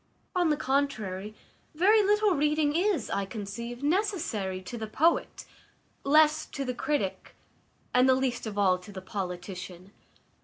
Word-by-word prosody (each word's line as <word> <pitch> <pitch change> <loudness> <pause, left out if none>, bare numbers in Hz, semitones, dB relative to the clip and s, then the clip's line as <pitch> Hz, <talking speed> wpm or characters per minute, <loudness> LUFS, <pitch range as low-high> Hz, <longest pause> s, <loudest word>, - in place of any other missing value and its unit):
On 350 -2 +3
the 300 - +2
contrary, 215 -9 -1 0.4
very 410 +7 +5
little 420 +1 +3
reading 300 0 +1
is, 355 - +1
I 200 - 0
conceive, 235 +4 -6
necessary 295 - -1
to 210 - -7
the 220 -2 -5
poet, 320 +10 +1 0.6
less 305 +2 +4
to 275 - -5
the 250 - -2
critic, 245 -6 -2 0.6
and 250 +1 +5
the 260 - +6
least 255 -3 -1
of 205 -1 -6
all 185 -3 +3
to 180 +3 -12
the 190 - -7
politician. 180 -1 -6
255 Hz, 145 wpm, -28 LUFS, 200-310 Hz, 0.6 s, the